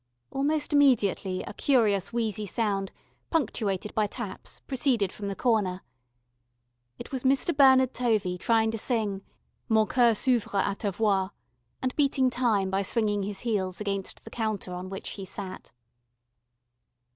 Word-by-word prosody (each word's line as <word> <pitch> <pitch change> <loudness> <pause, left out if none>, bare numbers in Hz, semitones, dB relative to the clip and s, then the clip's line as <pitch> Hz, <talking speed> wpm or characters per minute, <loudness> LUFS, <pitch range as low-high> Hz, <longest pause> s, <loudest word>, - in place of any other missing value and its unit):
Almost 295 +2 0
immediately 210 -9 +3
a - - -8
curious 215 -7 +2
wheezy 215 -3 -2
sound, 195 -2 -1 0.4
punctuated 210 - -1
by 215 -1 +1
taps, - - -6
proceeded 245 -7 0
from 205 - -6
the 200 - -3
corner. 205 -7 0 1.1
It - - -9
was 265 -2 -3
Mr. 275 +5 +2
Bernard 265 -2 +6
Tovey 215 -7 +1
trying 225 +1 +2
to 225 - -3
sing, 210 -5 -1 0.5
"Mon 220 -1 +4
coeur 235 -1 +3
s'ouvr' 235 -4 +1
à 200 - -1
ta 205 - -2
voix," 195 -2 +1 0.5
and 255 0 -1
beating 270 -3 +2
time 220 -7 +1
by 195 +1 +1
swinging 205 0 0
his 200 0 -4
heels 190 -6 -1
against 195 -2 -4
the - - -11
counter 215 -5 -3
on 180 +1 -6
which 195 - -7
he 195 - -7
sat. 190 0 -7
215 Hz, 145 wpm, -27 LUFS, 195-250 Hz, 1.1 s, Bernard